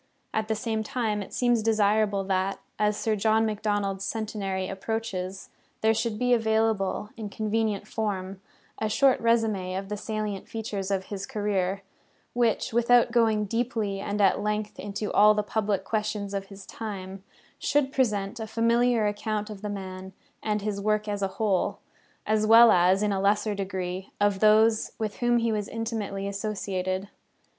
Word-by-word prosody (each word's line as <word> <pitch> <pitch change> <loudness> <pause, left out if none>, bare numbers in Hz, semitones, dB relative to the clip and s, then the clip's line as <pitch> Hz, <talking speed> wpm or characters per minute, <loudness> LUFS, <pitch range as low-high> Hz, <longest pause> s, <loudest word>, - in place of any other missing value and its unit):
At 220 0 -1
the 220 - 0
same 220 0 -2
time, 220 -2 -1
it 195 - -8
seems 240 -2 +2
desirable 215 -2 +2
that, 190 0 -1 0.2
as 210 0 +2
Sir 220 0 0
John 220 +2 +2
Macdonald's 205 -2 -1
centenary 200 -4 -3
approaches, 195 -2 -4 0.3
there 220 0 +4
should 225 -1 -1
be 245 +2 +2
available, 220 -3 +1
in 215 -2 -5
convenient 215 -1 -1
form, 195 -3 -3 0.4
a 220 - 0
short 265 +4 +3
résumé 215 -6 +1
of 195 0 -5
the 210 - -3
salient 210 -2 -4
features 210 -4 -4
of 190 -1 -1
his 200 0 -5
{viii} - - -16
career, 200 -2 -1 0.5
which, 235 -2 +1
without 240 0 +4
going 220 -3 +3
deeply 225 -2 -1
and 205 +1 -3
at 195 - +4
length 210 0 -2
into 205 +1 -4
all 210 +1 +6
the 210 - +1
public 205 -2 -1
questions 210 -1 -2
of 195 -1 -3
his 195 -1 -11
time, 195 -3 -7 0.4
should 285 -2 +1
present 210 -3 0
a 220 - -4
familiar 230 0 +2
account 210 +1 -2
of 200 -2 -9
the 210 - -4
man 190 -1 -6 0.3
and 210 -1 -1
his 205 -1 -2
work 215 +1 0
as 205 -1 -2
a 195 - +2
whole, 205 -4 +1 0.5
as 215 0 +1
well 230 +1 +9
as, 185 +2 +4
in 210 - +1
a 195 -1 0
lesser 210 +2 +2
degree, 190 -1 -4
of 205 -1 +2
those 220 +1 +4
with 215 -2 -3
whom 240 -1 +2
he 230 -1 +1
was 210 -2 -1
intimately 220 -4 -3
associated. 195 -2 -3
210 Hz, 165 wpm, -27 LUFS, 195-220 Hz, 0.5 s, well